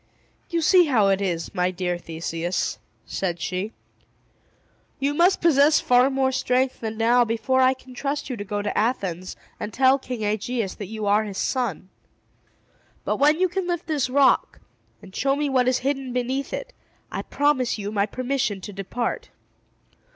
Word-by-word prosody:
"You 335 -1 0
see 355 +2 +6
how 225 -9 +3
it 195 0 +2
is, 170 -4 -2
my 180 0 +1
dear 180 -1 -2
Theseus," 165 +1 -3 0.3
said 175 -3 -3
she. 185 +5 -3 1.3
"You 280 +1 0
must 350 +5 +3
possess 300 -2 +5
far 250 +1 +4
more 265 -1 +1
strength 255 0 0
than 220 -1 -4
now 240 +2 +4
before 235 +3 +1
I 260 0 +4
can 260 0 -15
trust 280 +3 -3
you 255 - -3
to 205 - -5
go 205 +1 -3
to 205 - -2
Athens, 185 -6 -1 0.2
and 210 - -4
tell 265 +2 +4
King 250 -4 -5
Aegeus 215 0 -1
that 205 - -7
you 215 +1 -5
are 205 +2 +3
his 200 -3 -6
son. 235 - -2 1.2
But - - 0
when 300 +3 +4
you 370 - +4
can 360 +1 -3
lift 345 -1 -2
this 295 -5 -1
rock, 275 +1 +3 0.4
and 190 -1 -13
show 275 0 +1
me 290 0 -1
what 255 -2 +2
is 255 0 +3
hidden 270 -2 -1
beneath 255 +3 -2
it, - - -5 0.4
I - - -3
promise 280 -5 +1
you 205 0 -4
my 205 -1 +1
permission 250 -4 -2
to 205 - -8
depart." 235 - -3
250 Hz, 175 wpm, -24 LUFS, 205-275 Hz, 1.3 s, see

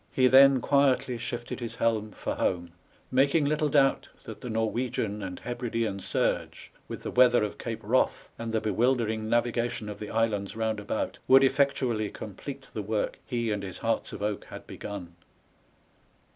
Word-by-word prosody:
He 130 - +3
then 135 0 +7
quietly 135 -3 +2
shifted 120 +1 -5
his 120 -2 -5
helm 110 -2 0
for - - -3
home, 85 -2 -1 0.4
making 140 +4 +3
little 150 +1 +1
doubt 135 -1 +3
that - - -9
the 125 - -6
Norwegian 110 -1 -1
and 90 -2 -5
Hebridean 115 -4 -2
surge, - - -1 0.2
with - - -7
the - - -4
weather 125 -2 +5
of 105 - -4
Cape 115 -2 -5
Wrath 120 +5 +1
and 115 -1 -4
the 110 - +1
bewildering 110 0 0
navigation 120 -2 0
of 105 - -7
the 105 - -6
islands 110 -3 0
round 110 -1 -1
about, 105 +1 -3
would 135 +1 +7
effectually 130 -6 +1
complete 130 +8 -8
the 110 - -3
work 105 +1 -2
he 120 -3 -1
and 105 -1 -1
his 95 -2 -7
hearts - - -1
of 100 - -6
oak 105 -1 -2
had - - -10
begun. 95 -4 -7
115 Hz, 165 wpm, -28 LUFS, 105-130 Hz, 0.4 s, then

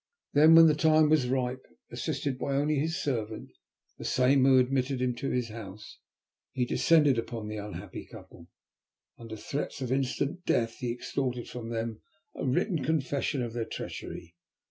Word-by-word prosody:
Then 155 +3 +7
when 165 0 +10
the 155 - +5
time 155 0 +4
was 140 -6 +3
ripe, 130 0 -1 0.3
assisted 130 -3 -3
only 140 +2 +1
by 140 - +1
his 165 +4 -1
servant, 110 -6 -3 0.5
the - - -7
same 130 +1 +3
who 135 -1 +6
had 130 - +5
admitted 130 0 -1
him 125 -1 0
to 135 - -3
his 125 -2 -1
house, 105 -2 -10 0.5
he 125 -1 0
descended 145 -1 +3
upon 115 -2 -5
the 105 0 -5
unhappy 100 -3 -7
couple. 85 -1 -13 0.7
Under 115 -2 -8
threats 140 +7 -4
of 130 -2 -3
instant 135 +6 -1
death 115 -7 0
he 120 -2 -3
extorted 125 0 -3
from 120 -2 -7
them 115 -1 -4 0.3
a - - -6
written 160 - 0
confession 140 -3 -1
of 115 -2 -5
their 120 -1 -2
treachery. 85 -5 -7
130 Hz, 165 wpm, -29 LUFS, 115-140 Hz, 0.7 s, when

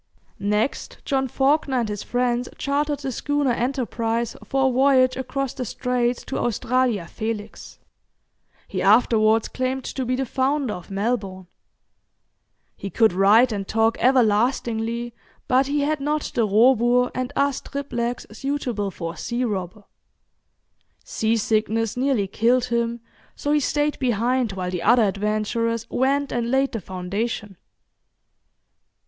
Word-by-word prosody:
Next, 210 +5 -1
John 265 -2 0
Fawkner 270 0 +1
and 230 - -2
his 210 -1 -4
friends 245 0 -1
chartered 290 0 -1
the 270 -1 -3
schooner 290 +2 0
'Enterprise' 235 -2 -1
for 270 -1 +1
a - - +2
voyage 255 0 +4
across 270 0 -3
the 255 - -4
Straits 245 0 -1
to - - -3
Australia 240 -3 0
Felix. 215 +3 -6 0.9
He - - -3
afterwards 220 +1 +4
claimed 260 +1 -2
to 265 - -4
be 255 +1 0
the 265 +1 -1
founder 265 0 0
of 180 - -9
Melbourne. 195 -2 -2 1.3
He 200 - -6
could 220 +1 +3
write 210 +6 +5
and 200 -2 -3
talk 225 0 +2
everlastingly, 235 -1 +1 0.3
but 260 +1 +3
he 290 +1 0
had 300 +1 0
not 295 +2 -2
the 230 -3 +1
'robur' 240 +3 +4
and 255 +1 -3
'as 280 -1 +1
triplex' 245 -4 -4
suitable 245 -4 -2
for 165 -3 -6
a - - -16
sea 240 +1 -2
robber. 205 -2 -4 1.2
Sea 220 +1 0
sickness 220 0 0
nearly 255 -5 +1
killed 235 +5 +2
him, 235 -1 -1 0.3
so 290 - -2
he 300 - +4
stayed 295 +1 0
behind 245 -1 0
while 180 -1 -3
the 180 -2 -3
other 240 -1 +5
adventurers 215 +3 -1
went 275 +2 +1
and 235 -1 -1
laid 270 +2 +2
the 225 - -4
foundation. 195 +3 -4
240 Hz, 135 wpm, -23 LUFS, 215-265 Hz, 1.3 s, write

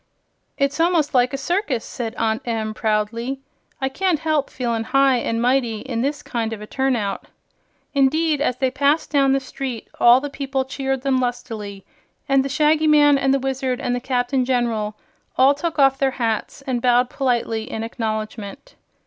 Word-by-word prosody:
"It's 280 +2 0
almost 330 -3 +2
like 250 -1 +3
a 275 - -3
circus," 305 - -1
said 235 -2 -5
Aunt 220 0 0
Em, 220 -2 -2
proudly. 225 +5 -1 0.4
"I 265 - 0
can't 360 +5 0
help 305 -2 0
feelin' 235 -3 -2
high 270 0 +3
an' 230 -1 -2
mighty 240 -3 +1
in 240 -4 -3
this 290 +3 -2
kind 230 -2 -3
of 220 - -6
a 210 - -8
turn 265 +3 0
out." 205 -4 -3 0.7
Indeed, 295 +2 +2
as 255 -4 0
they 260 -1 0
passed 285 +4 +1
down 275 -2 +3
the 275 - +2
street, 260 -3 -6
all 240 +1 +7
the 290 - -4
people 270 -1 -2
cheered 270 -1 -3
them 270 -2 +2
lustily, 220 -5 -4 0.4
and 275 -1 +3
the 275 - -3
Shaggy 305 +2 +2
Man 290 -2 +5
and 270 0 +2
the 275 - +3
Wizard 265 -1 -2
and 245 - -1
the - - -2
Captain 250 +1 0
General 235 -4 -1 0.4
all 265 +2 +6
took 320 +3 -4
off 270 -1 +4
their 270 - +3
hats 230 +3 -2
and 255 -3 -2
bowed 245 0 +3
politely 235 -4 -1
in 225 - -4
acknowledgment. 220 - -5
260 Hz, 180 wpm, -21 LUFS, 230-275 Hz, 0.7 s, all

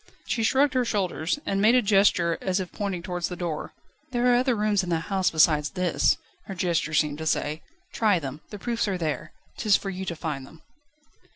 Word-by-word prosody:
She 230 - -1
shrugged 265 +5 +3
her 255 -1 +2
shoulders, 190 - -1
and 195 0 0
made 225 +4 +5
a 250 - +5
gesture 195 -5 +3
as 190 0 0
if 185 -2 -5
pointing 195 -4 -3
towards 180 -2 -2
the 180 - -5
door. 170 -3 -4 0.4
"There 245 -1 +2
are - - +5
other 250 0 +2
rooms 210 -2 +2
in 180 - -5
the 165 -1 0
house 190 +1 0
besides 155 -1 +3
this," 180 -1 +1 0.3
her 195 - -7
gesture 170 -3 0
seemed 150 -1 +1
to 160 - -4
say; 155 0 -1 0.3
"try 210 -4 +3
them. 145 -1 -6
The 210 - -7
proofs 230 +2 -1
are 190 -2 -1
there, 160 -4 -3 0.3
'tis 210 -4 +4
for 195 - -5
you 190 0 -5
to 170 - -3
find 150 -4 -4
them." 160 - -17
185 Hz, 210 wpm, -26 LUFS, 165-210 Hz, 0.4 s, made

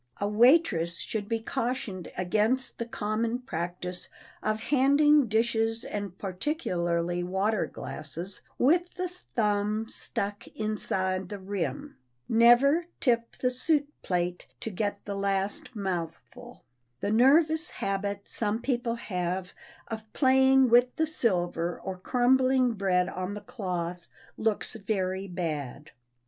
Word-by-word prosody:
A 200 - 0
waitress 210 - +4
should 205 +2 -4
be 225 -1 0
cautioned 230 -6 -3
against 215 +8 0
the 235 - -3
common 225 +1 -1
practise 180 -5 -5 0.3
of 215 0 0
handing 285 +1 +5
dishes 225 +1 +1
and 200 -3 -5
particularly 175 - -1
water 190 +4 0
glasses 170 +6 -7 0.2
with 345 +7 +3
the 365 0 -2
thumb 215 - -1
stuck 205 -1 -4
inside 190 -4 0
the 205 - -5
rim. 200 +9 -4 0.3
Never 245 +8 +5
tip 235 -2 +1
the 250 - 0
soup 285 +3 +1
plate 180 -1 -2
to 225 - -4
get 205 +1 -3
the 205 - -3
last 200 +4 -2
mouthful. 195 +6 -5 0.4
The 205 - 0
nervous 310 +8 +4
habit 200 +1 -3
some 215 0 0
people 240 -2 -1
have 180 -4 -3 0.3
of 220 -1 -7
playing 265 -1 +5
with 245 +2 +5
the 320 - +2
silver 175 - 0
or 190 - -5
crumbling 255 +3 +3
bread 185 -3 +1
on 185 +2 -4
the - - -5
cloth 180 -5 -4 0.3
looks 220 -2 -1
very 195 -2 -2
bad. 155 -6 -4
215 Hz, 120 wpm, -28 LUFS, 185-250 Hz, 0.4 s, handing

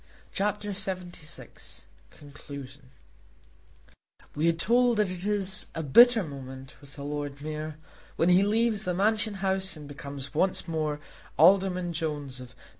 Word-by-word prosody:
CHAPTER 210 +1 -1
LXXVI 185 -4 -6 0.3
Conclusion 140 -2 -11 1.4
We 155 +3 +2
are - - +5
told 235 +8 +2
that 210 -3 +1
it 185 +2 -4
is 200 -2 +2
a 165 - -3
bitter 235 - +7
moment 135 -3 -9
with 140 -1 -11
the 140 - -8
Lord 145 -1 -4
Mayor 155 0 -5 0.4
when 165 - +2
he 180 +1 +6
leaves 215 +1 +1
the 180 -2 -1
Mansion 210 +2 +1
House 190 -1 +1
and 150 -1 -10
becomes 140 -1 -8
once 185 +4 +1
more 155 -2 -2 0.4
Alderman 180 +1 +4
Jones, 145 -5 -4
of 125 -1 -12
No. 125 - -22
165 Hz, 140 wpm, -28 LUFS, 145-195 Hz, 1.4 s, bitter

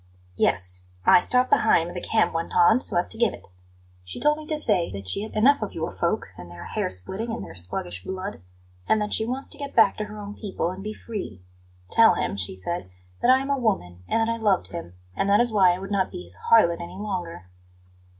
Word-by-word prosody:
"Yes; 90 0 0 0.2
I - - +7
stopped 250 +7 +1
behind 170 -6 +4
when 175 - -7
the 180 - -5
camp 225 - +1
went 165 0 -3
on, 180 +7 +5
so 255 - +6
as 175 - +1
to 225 - -4
give 235 -4 +2
it. - - -18 0.5
She 90 - -7
told 300 +1 +2
me 305 - -10
to 310 - 0
say 195 - +1
that 100 -1 -7
she 145 - +1
has 215 - -6
had - - -7
enough 275 +5 +4
of 215 - -4
your 165 +1 -3
folk 170 - -2
and 90 0 -10
their 85 0 -10
hair - - -2
splitting 190 - -5
and 225 - -5
their - - -11
sluggish 90 0 -4
blood; 190 - -6 0.5
and 220 - +3
that 210 0 -2
she 220 - +1
wants 260 +3 -5
to - - -8
get 280 -1 -6
back 220 -4 +5
to 215 - -3
her 210 0 -10
own 205 0 -7
people 195 -5 -3
and 190 +1 -8
be 215 +1 -5
free. 185 - -7 0.5
'Tell 230 0 +6
him,' - - -2
she 95 -1 -4
said, 95 - -4 0.3
'that 245 - +2
I 260 +1 +6
am 275 +1 -3
a 280 - +1
woman, 90 - -2
and 225 0 +1
that 230 - +1
I - - -4
loved 210 -5 +1
him; 130 - -7 0.2
and 195 - 0
that 205 - +5
is 240 -1 +2
why 190 -4 +5
I 175 - -1
would 195 +2 -8
not 195 -2 +1
be 90 - -7
his 90 +1 -8
harlot 170 -7 +5
any 170 - -8
longer.' 180 - -5
195 Hz, 245 wpm, -25 LUFS, 165-225 Hz, 0.5 s, I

